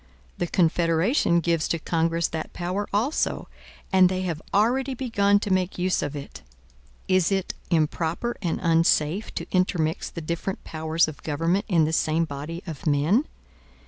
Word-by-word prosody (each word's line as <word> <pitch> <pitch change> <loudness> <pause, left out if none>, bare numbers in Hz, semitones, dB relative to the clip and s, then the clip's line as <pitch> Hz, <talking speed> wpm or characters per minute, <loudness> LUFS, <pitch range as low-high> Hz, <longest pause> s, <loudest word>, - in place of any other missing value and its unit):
The 175 - 0
Confederation 170 - +2
gives 165 -1 +1
to 170 - 0
Congress 165 0 0
that 160 -1 -5
power 185 +4 -3
also; 235 +10 0 0.5
and 185 -1 +6
they 185 0 -2
have 165 -4 -3
already 255 +6 +2
begun 205 -5 +2
to 205 -3 0
make 185 0 0
use 180 +1 +1
of 145 0 -3
it. 140 - -8 0.7
Is 185 -1 +3
it 190 -1 -1 0.2
improper 165 +7 0
and 170 -4 -1
unsafe 165 +2 +2
to - - -3
intermix 180 -3 0
the - - -7
different 170 +4 -4
powers 160 +1 0
of 155 - -8
government 165 +7 0
in 170 -7 +3
the 160 - -2
same 160 +1 +1
body 155 +4 -6
of 160 -3 -7
men? 155 - +2
170 Hz, 155 wpm, -25 LUFS, 160-190 Hz, 0.7 s, and